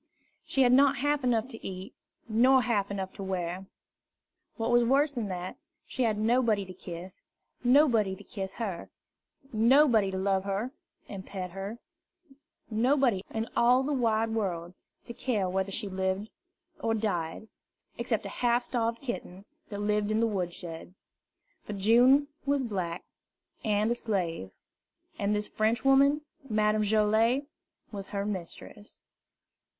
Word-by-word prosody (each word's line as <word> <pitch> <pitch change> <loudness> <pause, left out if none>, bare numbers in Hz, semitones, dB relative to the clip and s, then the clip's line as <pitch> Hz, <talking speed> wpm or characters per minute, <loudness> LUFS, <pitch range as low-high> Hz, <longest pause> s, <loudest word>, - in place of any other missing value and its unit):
She 270 - +2
had 245 - +4
not 275 +2 +5
half 290 +1 0
enough 240 -2 +1
to 225 - -10
eat, 190 +1 -7 0.3
nor 250 +4 +5
half 210 -5 0
enough 190 -2 -4
to 195 - -5
wear. 185 0 -3 0.9
What 230 0 -1
was 240 0 +5
worse 280 +5 +3
than 235 -5 -3
that, 180 -1 -5 0.3
she - - -5
had 215 -2 +1
nobody 220 -2 +2
to 185 - -9
kiss, 180 +1 -9 0.4
and 245 - +3
nobody 230 -10 +4
to - - -13
kiss 190 -2 -6
her; 200 -7 -5 0.6
nobody 230 -2 +5
to 190 - -3
love 190 0 +1
her 200 +5 -2 0.4
and 195 -2 -7
pet 185 -2 -6
her; 195 +4 -6 0.9
nobody 240 -2 +2
in 225 +1 -3
all 250 +2 +4
the 290 +2 -1
wide 225 -3 +1
world 180 -6 -2 0.3
to 235 - -7
care 225 -6 -1
whether 190 +1 -1
she 210 +1 -3
lived 190 +2 -2 0.5
or 225 0 0
died, 200 -2 -2 0.5
except - - -1
a - - -4
half 240 0 +1
starved 230 -1 -1
kitten 200 -6 -6 0.2
that 205 -1 -5
lived 210 0 +1
in 215 0 +1
the 230 - +3
wood 190 -6 -1
shed. 170 +1 -9 0.7
For 210 - -5
June 245 +8 +5 0.2
was 280 -1 +1
black, 185 -7 -3 0.6
and 215 +1 +1
a - - +4
slave; 180 - -2 0.7
and 205 +1 +1
this 210 0 -1
Frenchwoman, 270 +7 +3 0.3
Madame 215 0 +2
Joilet, 220 +5 +3 0.5
was 200 -2 -6
her 200 -1 -3
mistress. 205 +1 -7
215 Hz, 145 wpm, -29 LUFS, 190-240 Hz, 0.9 s, not